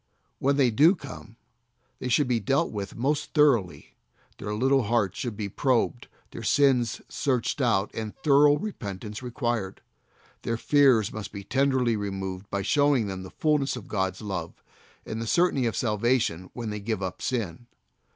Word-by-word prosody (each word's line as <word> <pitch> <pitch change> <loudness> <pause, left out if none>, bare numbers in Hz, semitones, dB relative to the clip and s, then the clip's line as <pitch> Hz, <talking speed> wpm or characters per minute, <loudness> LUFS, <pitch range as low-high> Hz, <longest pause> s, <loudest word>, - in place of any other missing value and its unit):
When 140 +1 +2
they 130 -4 +4
do 155 - +5
come, 125 - -10 0.6
they - - -4
should 125 +3 +2
be 120 -2 +1
dealt 135 +9 +1
with 100 -2 -5
most 145 +5 -1
thoroughly, 130 - +2 0.5
their 105 - -4
little 135 +4 +3
hearts 105 -4 0
should 120 -5 -4
be 105 - -3
probed, 120 +2 0 0.2
their - - -7
sins 130 -5 +2
searched 130 0 -1
out 110 -5 +2
and 110 -1 -5
thorough 145 0 +5
repentance 105 - -6
required. 120 -5 -3 0.6
Their 115 - -2
fears 130 -5 +3
must 110 -1 -6
be 100 -1 -7
tenderly 130 0 +1
removed 95 -1 -4
by 100 -1 -2
showing 145 -4 +3
them 95 -2 -5
the 95 - -9
fullness 145 - 0
of 120 -6 -9
God's 95 +1 -2
love, 90 -5 -5 0.4
and 110 +1 -4
the 115 - -4
certainty 155 -5 +2
of 115 - -2
salvation 105 -5 0
when 115 -3 -5
they 105 - -4
give 105 -1 -3
up 90 -1 -5
sin. 120 -4 -3
115 Hz, 160 wpm, -26 LUFS, 100-135 Hz, 0.6 s, do